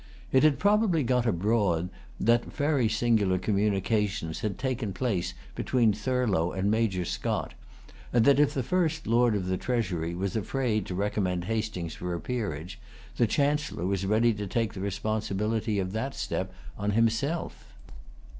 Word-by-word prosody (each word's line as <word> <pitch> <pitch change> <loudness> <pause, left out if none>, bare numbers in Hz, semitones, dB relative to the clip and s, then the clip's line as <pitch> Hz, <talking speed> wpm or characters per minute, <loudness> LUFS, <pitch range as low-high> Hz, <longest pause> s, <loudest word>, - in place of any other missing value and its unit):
It 130 - +5
had 150 -2 +4
probably 205 -6 +3
got 125 -1 +1
abroad 95 -3 +1 0.3
that 120 +2 +3
very 145 -6 +1
singular 110 -4 +2
communications 100 -2 0
had 105 -3 -3
taken 125 -6 -2
place 95 - -1 0.2
between 115 -5 +2
Thurlow 105 -6 0
and 95 +2 0
Major 105 -5 +1
Scott, - - -2 0.6
and 120 -2 +3
that, 140 0 +5
if 150 - +4
the 130 - 0
first 160 +1 0
Lord 115 0 +3
of 95 -3 -1
the 95 0 -1
Treasury 90 -10 -1
was 95 +2 -2
afraid 110 -1 -1
to 90 - -4
recommend 95 -3 -1
Hastings 110 -6 -3
for 90 0 -4
a - - -4
peerage, 90 -4 -4 0.4
the 120 - +3
Chancellor 145 - 0
was 95 0 0
ready 110 +4 +3
to 105 -1 -5
take 115 +2 -1
the 95 - -6
responsibility 105 +2 -1
of 95 -1 -1
that 130 +6 -3
step - - -3 0.3
on 105 0 0
himself. 115 +9 -1
110 Hz, 155 wpm, -28 LUFS, 95-125 Hz, 0.6 s, It